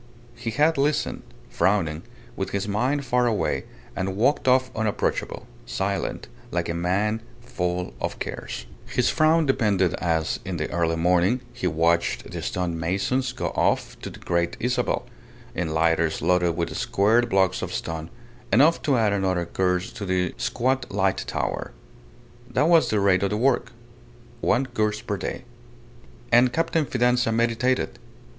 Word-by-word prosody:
He 115 - -5
had 150 +6 +2
listened, 150 +2 0 0.3
frowning, 85 -6 +1 0.3
with - - -3
his 100 0 -2
mind 130 +8 0
far 125 -1 +2
away, 110 -3 0 0.3
and 95 0 -2
walked 130 +7 +2
off 130 0 +4
unapproachable, 110 -2 -1 0.2
silent, 100 -7 -2 0.2
like 85 -1 -1
a - - 0
man 100 +6 0 0.2
full 90 -7 -3
of - - -2
cares. - - -5 0.2
His 125 - +1
frown 160 +1 +3
deepened 110 -8 +2
as, 85 -3 0
in - - -4
the - - -3
early 85 -1 +1
morning, 90 +8 +2
he 90 - -2
watched 85 +1 +1
the - - -5
stone 85 -2 -2
masons 100 +10 0
go - - -3
off - - 0
to - - -6
the - - -11
Great 85 0 -1
Isabel, 125 +2 0 0.5
in 90 -3 -2
lighters 80 0 +2
loaded 90 -2 +2
with 85 -1 -2
squared 115 +5 +2
blocks 95 -1 +2
of - - -4
stone, 80 -1 -4 0.4
enough 145 +11 +5
to 140 -4 +2
add 110 -3 +2
another 95 -3 0
course 90 +1 0
to 100 - -6
the 90 -1 0
squat 125 +1 -1
light - - 0
tower. - - -3 0.8
That 135 +5 +2
was 165 -2 +5
the 105 - +2
rate 100 -2 +3
of 100 - +1
the 105 - -1
work. 120 0 +1 0.7
One 130 +3 +2
course 110 -4 -1
per 100 -2 -3
day. 95 - -5 0.9
And 120 +1 +6
Captain 165 0 0
Fidanza 125 -1 +2
meditated. 115 +3 0
105 Hz, 150 wpm, -24 LUFS, 90-125 Hz, 0.9 s, And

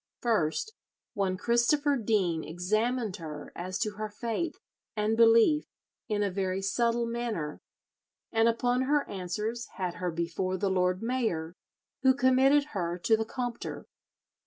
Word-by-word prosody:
First, 225 - 0 0.4
one 190 -2 0
Christopher 240 +7 +2
Dene 200 -9 +1
examined 215 +6 -1
her 150 -3 -8
as 185 +2 -4
to 210 -3 -2
her 215 0 -3
faith 235 +10 -3 0.4
and 215 +1 +1
belief 230 +7 +5 0.4
in 205 -1 +1
a 200 - 0
very 190 0 -1
subtle 235 +4 +1
manner, 230 -10 -3 0.7
and 225 0 +3
upon 245 +2 +2
her 290 -1 +2
answers 210 +5 -3
had 180 -2 -3
her 180 - 0
before 170 +3 -2
the 195 +1 0
lord 185 +1 +1
mayor, 220 -10 -1 0.5
who 260 0 +5
committed 270 +3 +4
her 175 -3 -2
to 220 +5 +3
the 220 0 -1
Compter. 245 0 -5
215 Hz, 135 wpm, -29 LUFS, 185-240 Hz, 0.7 s, belief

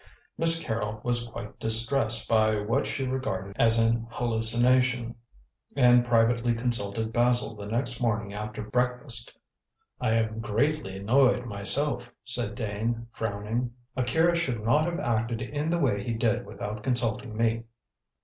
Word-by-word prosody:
Miss 165 0 +2
Carrol 110 -6 -3
was 120 -1 0
quite 105 -2 -9
distressed 115 +1 +4
by 110 -1 +3
what 105 +2 -1
she 135 - -3
regarded 100 -7 -4
as 115 0 +4
an 115 0 +1
hallucination, 120 +1 +1 0.6
and 125 -3 +5
privately 120 0 +2
consulted 115 -2 -2
Basil 120 +1 +2
the 100 -1 -8
next 120 +2 -3
morning 105 -4 -1
after 105 +1 -6
breakfast. 125 0 0 0.6
"I 110 - 0
am 110 -1 0
greatly 115 -1 -1
annoyed 125 +4 +2
myself," 120 +4 +2
said 120 -3 -2
Dane, 115 +1 -3
frowning. 115 +3 -3 0.2
"Akira 160 +7 +2
should 130 -10 -2
not 150 +8 +2
have 170 0 -3
acted 115 0 -1
in 145 +6 -3
the 170 - +1
way 115 -11 0
he 115 - -3
did 110 -1 0
without 105 +1 -6
consulting 120 -1 -1
me." 115 0 0
115 Hz, 140 wpm, -27 LUFS, 110-125 Hz, 0.6 s, and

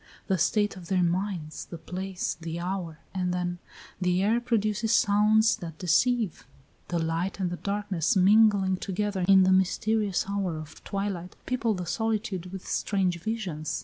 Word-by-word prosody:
The 190 -3 0
state 205 +4 +2
of 175 -2 -10
their 185 -1 +2
minds, 175 -3 -2
the 170 - -8
place, 185 +2 -4
the 165 +1 -4
hour 175 -3 -4 0.2
and 180 -2 -1
then, 175 0 -2 0.4
the 180 +1 +2
air 225 +4 +2
produces 220 -2 0
sounds 215 0 +4
that 165 -6 -8
deceive; 215 - +1 0.4
the 175 - -1
light 165 +4 -1
and 180 -2 -1
the 175 - -4
darkness 200 -5 -1
mingling 195 -1 +5
together 195 0 -2
in 195 -1 +7
the 185 - +4
mysterious 200 +1 +1
hour 195 -5 -2
of 155 0 -10
twilight 195 -3 -4
people 235 -4 0
the 180 -1 -4
solitude 215 -2 -2
with 190 -1 -8
strange 185 -4 0
visions. 180 -7 -3
190 Hz, 155 wpm, -27 LUFS, 175-210 Hz, 0.4 s, in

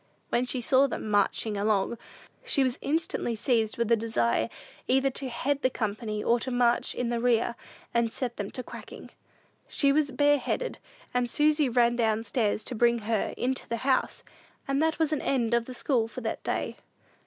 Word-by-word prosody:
When 250 +1 +1
she 250 0 -1
saw 265 +3 +4
them 220 -4 -4
"marshin' 205 +1 +1
along," 205 +2 0 0.4
she 395 - +2
was 255 -2 -1
instantly 300 -6 -1
seized 225 -1 0
with 235 -1 0
a - - +7
desire 120 - 0 0.4
either 265 +1 +3
to 265 0 -4
head 275 +4 -1
the 255 - +3
company 215 -2 -3
or 235 +1 +3
to 260 - -4
march 245 -1 +2
in 245 -1 -1
the 240 -1 -1
rear, 235 -1 +2 0.4
and 235 -1 +2
set 245 -2 -4
them 205 -1 -3
to 255 - -5
quacking. - - -10 0.6
She 280 -2 +2
was 295 0 +2
bareheaded, 290 - +1 0.3
and 250 -1 +1
Susy 295 +1 +3
ran 240 0 +3
down 220 -2 +1
stairs 215 -1 0
to - - -4
bring 235 +1 +3
her 225 -3 0
into 260 +1 -2
the 235 - -1
house; 270 -1 +1 0.4
and 275 +1 +1
that 320 0 +1
was 315 -1 +1
an 300 - -1
end 240 -4 0
of 235 -1 +2
the 255 - -7
school 240 -4 +1
for 255 - -8
that 225 - -4
day. - - -2
240 Hz, 190 wpm, -28 LUFS, 225-265 Hz, 0.6 s, a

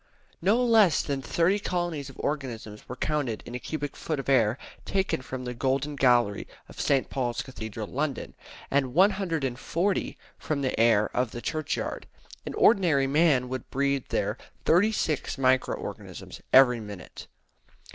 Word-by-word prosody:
No 220 +8 +3
less 215 -9 +5
than 140 -2 -2
thirty 170 +8 +1
colonies 175 -7 -2
of 135 - -14
organisms 120 -7 -4
were 125 - -5
counted 135 -5 -2
in 120 - -9
a 125 - -3
cubic 145 +1 -5
foot 155 -3 -3
of 135 - -4
air 120 -3 +3 0.3
taken 190 -8 -1
from 130 0 -6
the 125 - -4
Golden 135 +4 -1
Gallery 120 -7 +2 0.2
of - - -7
St. 135 -2 +2
Paul's 120 -3 -2
Cathedral, 110 -4 -6
London, 140 +4 -3 0.4
and 135 -2 +1
140 175 -2 +1 0.2
from 145 -3 -2
the 130 - -1
air 110 -2 +3
of 125 -1 +1
the 120 - -7
churchyard. 155 0 -3 0.4
An - - -4
ordinary 170 -11 +4
man 140 -2 +3
would 130 -1 -6
breathe 140 -1 0
there - - -1 0.3
thirty 190 +7 +4
six 155 -8 -1
micro 130 -1 +2
organisms - - -8
every 125 -2 +7
minute. 105 -4 -9
135 Hz, 150 wpm, -27 LUFS, 125-160 Hz, 0.4 s, every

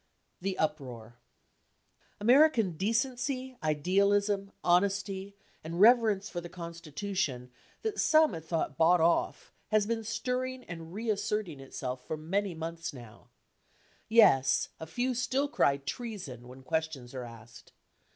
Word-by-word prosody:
THE 190 0 -2
UPROAR 130 -8 -3 1.1
American 240 - +5
decency, 255 - -1
idealism, 195 +6 +1
honesty 195 +2 +1 0.3
and 165 +2 -5
reverence 215 -2 +5
for 175 -4 -5
the 175 - -8
Consti 170 -2 -9
tution 150 -9 -2 0.3
that 440 -2 -2
some 310 -6 +5
had 165 -2 -6
thought 160 -4 -2
bought 170 +2 +5
off 165 +1 +1
has 215 -1 +2
been 225 +1 -2
stirring 255 +3 -3
and 165 -4 -9
reassert 215 0 -1
ing 145 -4 -9
itself 130 -1 -6
for 155 - -3
many 185 +4 -2
months 165 +1 -5
now. 120 -5 -13 0.8
Yes, 200 - +5
a 160 - -7
few 245 +9 -1
still 255 +3 0
cry 140 - +2
treason 140 - -6
when 130 +1 -12
questions 155 -5 -3
are 130 -1 -5
asked. 115 0 -13
185 Hz, 130 wpm, -30 LUFS, 155-225 Hz, 1.1 s, American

